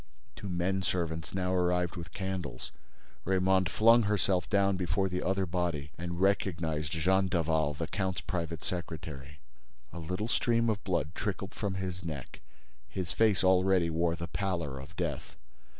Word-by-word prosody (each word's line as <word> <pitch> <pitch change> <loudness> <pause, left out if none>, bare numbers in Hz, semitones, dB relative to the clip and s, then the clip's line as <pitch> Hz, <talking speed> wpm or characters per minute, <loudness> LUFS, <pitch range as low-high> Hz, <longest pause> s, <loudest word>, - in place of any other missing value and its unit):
—" 65 - -36
Two 100 - -6
men 90 +2 0
servants 85 -3 -2
now 90 -1 0
arrived 90 -1 +1
with 85 +1 -7
candles. 95 -9 -4 0.5
Raymonde 95 0 +3
flung 115 +2 +6
herself 95 -5 +1
down 100 +1 +3
before 90 +1 +1
the 90 0 -2
other 95 0 +1
body 85 -5 -2
and 85 +1 -4
recognized 85 -6 +1
Jean 95 +4 +3
Daval, 80 -4 +1
the 80 +3 -2
count's 95 0 -2
private 85 -2 -3
secretary. 75 -5 -6 0.5
A 85 - -6
little 90 +6 -3
stream 115 -1 +2
of 100 -2 -3
blood 75 +5 -1
trickled 95 -1 -3
from 100 -3 -2
his 90 -1 -4
neck. 75 -5 -6 0.5
His 90 +1 -3
face 110 -5 +3
already 95 -2 +4
wore 85 +1 +1
the 85 0 -4
pallor 85 -10 -2
of 65 - -10
death. - - -3
90 Hz, 155 wpm, -31 LUFS, 80-95 Hz, 0.5 s, flung